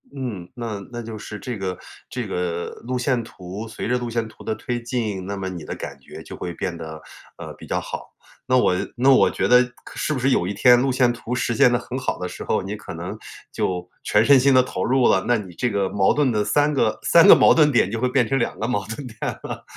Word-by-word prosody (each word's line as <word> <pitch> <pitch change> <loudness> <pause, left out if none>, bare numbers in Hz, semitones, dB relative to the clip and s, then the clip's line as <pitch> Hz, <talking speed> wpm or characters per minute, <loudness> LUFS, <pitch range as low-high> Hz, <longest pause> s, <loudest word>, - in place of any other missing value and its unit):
嗯， 110 -10 -5
那 115 -4 -4
那 120 -1 -5
就 115 -1 -7
是 105 -1 -8
这 120 +1 -5
个 95 -2 -4 0.3
这 125 -3 -4
个 90 -2 -3 0.2
路 125 +1 -2
线 125 -1 0
图， 100 0 -8
随 110 - -5
着 125 +2 +1
路 120 -1 -4
线 115 -1 -2
图 110 - -15
的 - - -2
推 120 +2 -4
进， 110 -6 -3
那 100 +1 -4
么 95 -1 -4
你 90 -4 -6
的 - - -6
感 - - -8
觉 - - -11
就 - - -9
会 90 - -5
变 85 +1 -4
得， 80 -1 -8 0.4
呃， - - -8
比 - - -13
较 - - 0
好。 - - -7 0.4
那 130 0 +4
我 105 -7 +3 0.2
那 130 +3 +4
我 130 - +5
觉 - - -1
得 125 0 +6 0.2
可 - - -12
是 - - -2
不 135 - -2
是 135 +2 +2
有 90 - +2
一 100 - -2
天 120 +5 +6
路 135 0 +1
线 125 -1 +3
图 120 0 -6
实 125 -1 0
现 135 -1 +5
得 120 - +2
很 125 +1 -6
好 130 - -2
的 90 - -3
时 - - -8
候， - - 0
你 100 +2 -4
可 105 - -9
能 90 +5 -6 0.4
就 90 -1 -2 0.2
全 105 +2 +3
身 140 +1 +7
心 135 +2 +4
地 130 - +7
投 125 - -4
入 130 +1 +3
了， 95 - +3
那 120 - +3
你 95 -4 -8
这 125 +8 -1
个 100 -3 0
矛 95 -1 +2
盾 145 -2 +2
的 105 -2 +1
3 145 +7 +2
个 115 -6 +1
3 170 -1 +6
个 - - +12
矛 - - +6
盾 150 -2 +4
点 120 -7 +3
就 115 +2 -3
会 125 - +2
变 125 -2 +2
成 135 - +1
2 120 - -2
个 - - -1
矛 120 -5 -1
盾 120 +5 -6
点 115 -2 -5
了。 - - -6
115 Hz, 275 characters per minute, -22 LUFS, 95-125 Hz, 0.4 s, 个